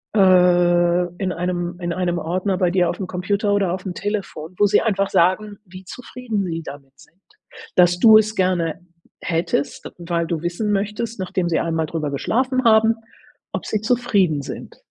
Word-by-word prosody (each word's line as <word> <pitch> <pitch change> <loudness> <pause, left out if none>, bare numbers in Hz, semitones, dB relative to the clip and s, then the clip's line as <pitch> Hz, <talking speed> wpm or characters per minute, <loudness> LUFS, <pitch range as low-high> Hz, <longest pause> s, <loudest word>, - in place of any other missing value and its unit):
äh 180 -3 +4 0.3
in 190 -1 -2
einem 175 0 -3
in 175 -1 -3
einem 175 -1 -1
Ordner 185 +4 -2
bei 180 -1 +1
dir 180 -1 +2
aufm 190 - -4
Computer 200 +3 -1
oder 195 -3 +1
aufm 185 0 -5
Telefon, 190 -5 -5
wo 205 - +4
sie - - +3
einfach 200 -3 0
sagen, 205 +4 +1
wie 185 0 -12
zufrieden 230 -2 -5
sie 165 -2 -4
damit 140 -2 -11
sind. 175 - -21 0.6
Dass 175 0 +4
du 220 0 +8
es 215 0 +1
gerne 175 -4 0 0.4
hättest, 165 -4 -2
weil 170 -1 -2
du 165 -2 -3
wissen 175 +5 -2
möchtest, 210 +3 -2
nachdem 185 -1 -2
sie 165 - +1
einmal 165 -1 -1
drüber 155 -3 -3
geschlafen 255 - 0
haben, 225 0 +5 0.6
ob - - -4
sie 215 - -2
zufrieden 215 - +1
sind. - - -9
185 Hz, 165 wpm, -21 LUFS, 175-205 Hz, 0.6 s, du